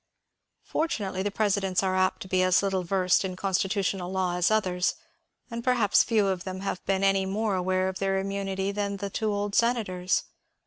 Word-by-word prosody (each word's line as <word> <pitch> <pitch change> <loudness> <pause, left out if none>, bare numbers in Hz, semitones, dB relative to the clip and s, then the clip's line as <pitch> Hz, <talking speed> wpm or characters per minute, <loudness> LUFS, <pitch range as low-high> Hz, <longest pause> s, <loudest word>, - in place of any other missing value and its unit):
Fortunately 205 - -2
the 205 - 0
presidents 200 -2 0
are 185 -1 +1
apt 185 0 +1
to - - -11
be 185 0 +1
as 185 +1 +3
little 195 -1 0
versed 185 +1 +2
in 185 -1 -3
constitutional 190 -1 -1
law 185 -2 0
as 180 -1 +2
others, 185 -4 +1 0.6
and 235 0 -4
perhaps 235 -5 +4
few 220 -4 +2
of 190 -2 -1
them 185 0 -6
have 195 -2 -3
been 195 0 +1
any 195 -1 +3
more 210 +2 -1
aware 185 0 0
of 190 0 -4
their 195 0 0
immunity 195 0 -2
than 200 0 -2
the 200 0 -5
two 220 +1 -1
old 205 0 -2
senators. 205 -7 +1
195 Hz, 185 wpm, -27 LUFS, 185-205 Hz, 0.6 s, perhaps